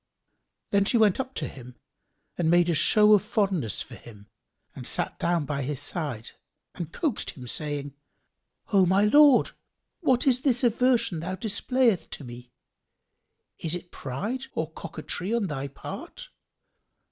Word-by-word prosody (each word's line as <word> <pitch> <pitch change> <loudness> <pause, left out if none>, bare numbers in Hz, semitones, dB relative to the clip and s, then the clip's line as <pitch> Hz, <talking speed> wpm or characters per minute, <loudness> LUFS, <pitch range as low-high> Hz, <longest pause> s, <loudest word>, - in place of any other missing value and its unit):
Then 200 0 +4
she 235 - +2
went 215 -2 +4
up 265 0 -4
to 150 - -3
him 125 -1 -11 0.6
and 165 -2 0
made 175 0 +4
a - - +1
show 210 +7 +5
of 205 - +6
fondness 195 - -1
for - - -14
him 105 -3 -14 0.4
and - - -6
sat - - -2
down 170 -3 0
by 140 -1 -3
his 140 +1 -2
side 145 -7 -1 0.4
and 170 -2 -6
coaxed 295 - -2
him, 125 - -9
saying, 145 +1 -4 0.8
"O 190 -2 +5
my 190 +3 +3
lord, 290 +4 +6 0.5
what 260 -8 +2
is 255 -2 +3
this 260 -3 +2
aversion 240 -6 +2
thou 180 +3 -4
displayest 225 +1 0
to - - -8
me? 120 0 -11 1.1
Is 165 0 -1
it 175 0 -8
pride 210 - -4
or 160 0 -2
coquetry 180 +7 -3
on 230 -3 0
thy 140 -5 -4
part? 140 - -9
175 Hz, 150 wpm, -26 LUFS, 145-225 Hz, 1.1 s, of